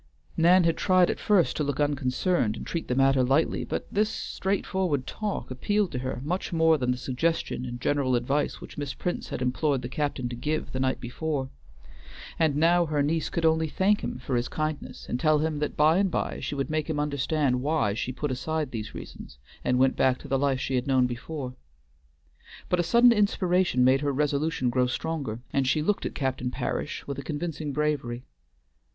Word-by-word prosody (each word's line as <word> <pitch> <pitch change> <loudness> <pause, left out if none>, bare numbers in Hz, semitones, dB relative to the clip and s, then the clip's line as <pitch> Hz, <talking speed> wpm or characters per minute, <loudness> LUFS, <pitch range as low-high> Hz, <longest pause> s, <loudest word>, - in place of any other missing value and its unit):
Nan 175 +2 +5
had 165 -1 +2
tried 185 -1 +4
at - - -5
first 200 -5 +3
to 150 - 0
look 145 -1 -2
unconcerned 145 - +1
and - - -7
treat 170 - -4
the 125 - 0
matter 135 0 +4
lightly, 135 +5 +2
but - - -3
this 210 +1 +2
straightforward 190 -9 -1
talk 210 -9 -4
appealed 205 +9 0
to 125 - -3
her 130 -1 -3
much 180 +7 -2
more 160 -2 +4
than 125 -1 -1
the 125 - +1
suggestion 130 +1 -1
and 120 0 -6
general 135 -1 +1
advice 135 +5 0
which - - -9
Miss 145 -2 -4
Prince 175 - -3
had 130 - -3
implored 130 +1 0
the - - -3
captain 140 -2 -2
to 120 - -5
give 150 +6 -2
the 130 - -3
night 130 0 0
before. 135 +2 -3 0.9
And 155 -3 +3
now 170 +3 +4
her 150 -2 +1
niece 160 +2 0
could 170 - -1
only 160 0 +3
thank 195 +6 +1
him - - -3
for 130 0 -3
his 120 +1 0
kindness, 155 -1 -4
and 125 - -2
tell 155 +2 +4
him 155 0 -1
that 150 - -3
by 155 +4 +5
and 195 -1 +2
by - - -2
she - - -4
would 140 +2 -2
make 155 0 -1
him 150 -2 -1
understand 145 -2 0
why 145 -7 +1
she 115 +4 -3
put 145 +2 -3
aside 150 +2 -2
these 110 -2 -5
reasons, 65 - -10 0.3
and 125 - +2
went 130 +1 +3
back 130 -1 +3
to - - -10
the 135 - +1
life 135 -2 +1
she 135 - -3
had 125 +1 0
known 130 -2 +4
before. 125 +2 -5 1.2
But 180 - +2
a - - +5
sudden 235 +8 +5
inspiration 185 - +2
made 130 +2 +4
her 145 -1 0
resolution 145 -1 0
grow 125 0 +2
stronger, 130 -5 -3
and 135 -2 +1
she 150 +3 +2
looked 205 +5 0
at - - -8
Captain 130 -2 -1
Parish - - -3
with 140 -1 -5
a - - -5
convincing 150 +1 -4
bravery. 140 -5 -1
145 Hz, 205 wpm, -27 LUFS, 130-160 Hz, 1.2 s, Nan